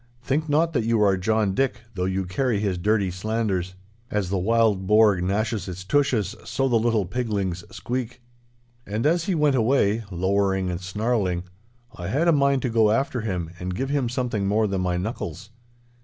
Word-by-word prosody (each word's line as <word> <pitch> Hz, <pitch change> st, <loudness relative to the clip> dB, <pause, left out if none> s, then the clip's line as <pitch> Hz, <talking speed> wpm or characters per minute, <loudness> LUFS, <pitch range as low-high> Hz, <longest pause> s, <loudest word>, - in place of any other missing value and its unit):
Think 150 Hz, +5 st, -1 dB
not 160 Hz, +3 st, +2 dB
that 120 Hz, -6 st, +1 dB
you 115 Hz, 0 st, +1 dB
are 100 Hz, -2 st, +4 dB
John 105 Hz, +1 st, +1 dB
Dick, 135 Hz, +4 st, 0 dB
though 90 Hz, -2 st, -2 dB
you 95 Hz, 0 st, -1 dB
carry 110 Hz, +4 st, 0 dB
his 100 Hz, -4 st, -1 dB
dirty 100 Hz, 0 st, +1 dB
slanders. 95 Hz, -2 st, -2 dB, 0.3 s
As 100 Hz, -3 st, -1 dB
the 100 Hz, -, +1 dB
wild 105 Hz, -1 st, +2 dB
boar 105 Hz, -3 st, +5 dB
gnashes 105 Hz, +4 st, -1 dB
its 90 Hz, 0 st, -6 dB
tushes, 115 Hz, -4 st, +1 dB
so 135 Hz, 0 st, -1 dB
the 120 Hz, -3 st, +3 dB
little 110 Hz, -3 st, +1 dB
piglings 100 Hz, -5 st, -2 dB
squeak!' 125 Hz, 0 st, -4 dB, 0.7 s
And 105 Hz, +4 st, -2 dB
as 170 Hz, +2 st, +2 dB
he 190 Hz, -, 0 dB
went 150 Hz, -3 st, +3 dB
away, 115 Hz, -2 st, +2 dB
lowering 95 Hz, 0 st, 0 dB
and 85 Hz, +1 st, -4 dB
snarling, 95 Hz, -2 st, -1 dB, 0.5 s
I 85 Hz, -, -6 dB
had 145 Hz, -, +1 dB
a -, -, +6 dB
mind 140 Hz, -3 st, +2 dB
to 125 Hz, -, 0 dB
go 110 Hz, -2 st, +4 dB
after 125 Hz, +2 st, 0 dB
him 90 Hz, -6 st, -3 dB
and 90 Hz, 0 st, -4 dB
give 135 Hz, +6 st, -2 dB
him 140 Hz, -4 st, 0 dB
something 120 Hz, -5 st, -1 dB
more 105 Hz, +2 st, +2 dB
than 95 Hz, -2 st, -1 dB
my 90 Hz, -1 st, 0 dB
knuckles. 95 Hz, -1 st, -5 dB
105 Hz, 185 wpm, -24 LUFS, 95-125 Hz, 0.7 s, a